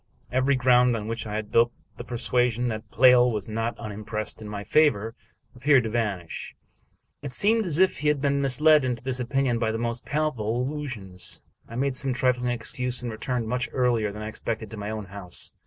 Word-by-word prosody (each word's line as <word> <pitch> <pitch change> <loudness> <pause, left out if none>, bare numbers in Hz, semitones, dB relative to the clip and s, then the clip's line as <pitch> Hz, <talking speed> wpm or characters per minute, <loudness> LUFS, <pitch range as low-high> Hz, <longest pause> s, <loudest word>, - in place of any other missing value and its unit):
Every 130 +2 +2
ground 125 -1 +4
on 105 -1 -6
which 115 -1 -4
I 105 - -4
had 110 -1 -4
built 120 +1 +4 0.3
the - - -6
persuasion 120 0 0
that 110 -1 -6
Pleyel 125 0 +6
was 105 -3 -4
not 115 +1 -3
unimpressed 105 0 -5
in 105 - -7
my 100 -1 -5
favor 115 -6 +2 0.4
appeared 135 +1 +4
to 110 - -3
vanish. 105 -7 -3 0.7
It 140 -3 -6
seemed 220 - +4
as 155 -3 +3
if 185 -4 +2
I - - +1
had 150 -1 +2
been 140 0 +1
misled 150 +2 +4
into 125 -2 -2
this 130 -1 -1
opinion 125 -1 0
by 110 -1 0
the 110 - -2
most 115 +1 -3
palpable 125 -7 -1
illusions. 125 -11 -5 0.3
I 115 - -8
made 135 +1 0
some 135 0 +3
trifling 125 -1 +1
excuse, 125 +1 -1
and 120 - -3
returned, 115 +1 -3
much 125 +2 -2
earlier 120 -5 +1
than 105 +1 -7
I - - -5
expected, 110 0 -5
to - - -6
my 105 0 -5
own 110 -1 -4
house. 95 -2 -5
120 Hz, 200 wpm, -25 LUFS, 110-130 Hz, 0.7 s, Pleyel